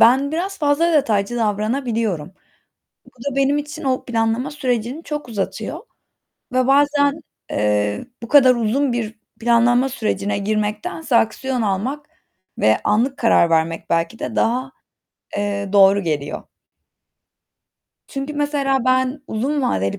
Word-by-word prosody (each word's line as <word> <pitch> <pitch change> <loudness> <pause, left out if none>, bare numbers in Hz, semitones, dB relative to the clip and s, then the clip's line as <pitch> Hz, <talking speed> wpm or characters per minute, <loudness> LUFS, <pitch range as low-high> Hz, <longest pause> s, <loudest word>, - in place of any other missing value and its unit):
ben 270 +5 +5
biraz 385 +4 -3
fazla 305 +3 +2
detaycı 235 -6 +1
davranabiliyorum. 215 - -1 0.7
Bu - - -17
da 265 +2 -6
benim 275 +1 +2
için 295 0 -6
o 260 -1 -1
planlama 230 +3 0
sürecini 255 +1 -2
çok 295 -4 -5
uzatıyor 205 -4 -4 0.7
ve 255 0 +2
bazen, 285 +2 +3 0.3
eee, 105 - 0 0.2
bu - - -5
kadar 260 -3 +6
uzun 240 +4 0
bir 225 -2 -4 0.2
planlama 240 +2 +3
sürecine 205 -5 -2
girmektense 215 +7 -2
aksiyon 250 +3 +1
almak, 225 +9 -2 0.5
ve 110 0 +3
anlık 250 +6 +1
karar 200 -7 +4
vermek, 165 0 0
belki 165 +6 0
de - - -4
daha, 255 +3 0 0.7
eee, 200 -1 -2
doğru 200 0 +6
geliyor. 150 -3 -3 1.6
Çünkü, 275 +2 -5
mesela, 280 -3 0
ben 255 +2 +1
uzun 270 +7 -1
vadeli 100 - 0
240 Hz, 125 wpm, -20 LUFS, 210-275 Hz, 1.6 s, kadar